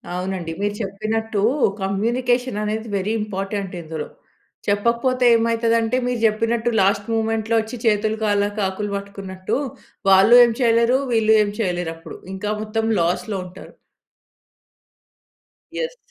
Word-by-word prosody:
అవునండి. 180 Hz, -2 st, -3 dB
మీరు 205 Hz, 0 st, -1 dB
చెప్పినట్టు 215 Hz, +2 st, -2 dB, 0.4 s
కమ్యూనికేషన్ 240 Hz, +4 st, 0 dB
అనేది 220 Hz, +2 st, -3 dB
వెరీ 195 Hz, +3 st, -2 dB
ఇంపార్టెంట్ 195 Hz, -1 st, -4 dB
ఇందులో. 160 Hz, -1 st, -6 dB, 0.6 s
చెప్పకపోతే 235 Hz, +5 st, +1 dB
ఏమైతది 230 Hz, 0 st, +1 dB
అంటే 225 Hz, +3 st, 0 dB
మీరు 250 Hz, -1 st, -1 dB
చెప్పినట్టు 230 Hz, +2 st, +1 dB
లాస్ట్ 200 Hz, +1 st, +2 dB
మొమెంట్‌లో 225 Hz, 0 st, 0 dB
వచ్చి 220 Hz, +2 st, -5 dB
"చేతులు, 215 Hz, 0 st, +2 dB
కాలాక 205 Hz, 0 st, 0 dB
ఆకులు 205 Hz, +2 st, -4 dB
పట్టుకున్నట్టు" 195 Hz, -2 st, -5 dB, 0.5 s
వాళ్ళు 195 Hz, +5 st, +6 dB
ఏం 235 Hz, -, +3 dB
చేయలేరు. 235 Hz, +1 st, +4 dB
వీళ్ళు 220 Hz, -1 st, +3 dB
ఏం 205 Hz, -, -3 dB
చేయలేరు. 175 Hz, -5 st, -1 dB
అప్పుడు 165 Hz, 0 st, -10 dB, 0.2 s
ఇంకా 205 Hz, +2 st, -4 dB
మొత్తం 220 Hz, +1 st, -2 dB, 0.2 s
లాస్‌లో 185 Hz, +4 st, -1 dB
ఉంటారు. 180 Hz, -, -12 dB, 2.1 s
యెస్. -, -, -3 dB
215 Hz, 120 wpm, -21 LUFS, 195-230 Hz, 2.1 s, వాళ్ళు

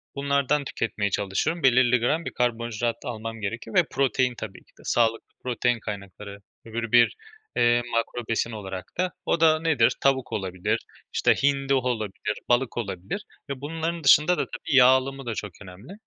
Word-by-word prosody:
Bunlardan 140 Hz, +1 st, +1 dB
tüketmeye 105 Hz, -5 st, -2 dB
çalışıyorum. 100 Hz, -, -1 dB
Belirli 125 Hz, -1 st, +5 dB
gram 155 Hz, +8 st, 0 dB
bir -, -, -4 dB
karbonhidrat 120 Hz, -1 st, -1 dB
almam 115 Hz, -1 st, -5 dB
gerekiyor 110 Hz, +2 st, -5 dB
ve -, -, +6 dB
protein 130 Hz, -1 st, +1 dB
tabii 110 Hz, -4 st, -7 dB
ki -, -, -29 dB
de. -, -, -14 dB
Sağlıklı 115 Hz, -1 st, +1 dB, 0.2 s
protein 120 Hz, -1 st, 0 dB
kaynakları 100 Hz, -1 st, -7 dB, 0.3 s
öbür 115 Hz, 0 st, -4 dB
bir, 120 Hz, -1 st, +5 dB, 0.4 s
eee, 120 Hz, 0 st, +4 dB
makro 115 Hz, 0 st, -2 dB
besin 115 Hz, +1 st, 0 dB
olarak 95 Hz, -4 st, -7 dB
da. 180 Hz, +1 st, 0 dB
O -, -, +1 dB
da 155 Hz, -1 st, +5 dB
nedir? 155 Hz, -8 st, +3 dB
Tavuk 135 Hz, -2 st, +1 dB
olabilir, 95 Hz, -3 st, -1 dB, 0.3 s
işte, -, -, +4 dB
hindi 140 Hz, -1 st, +2 dB
olabilir, 110 Hz, -5 st, -1 dB
balık 120 Hz, 0 st, +1 dB
olabilir. 100 Hz, -, -4 dB, 0.2 s
Ve 135 Hz, -1 st, -5 dB
bunların 165 Hz, +2 st, -3 dB
dışında 150 Hz, +6 st, +6 dB
da -, -, 0 dB
tabii 145 Hz, -, -4 dB
yağ 125 Hz, -2 st, +8 dB
alımı 135 Hz, +1 st, +2 dB
da 120 Hz, -, -2 dB
çok 105 Hz, -2 st, -5 dB
önemli. 95 Hz, -, -11 dB
120 Hz, 165 wpm, -25 LUFS, 110-135 Hz, 0.4 s, yağ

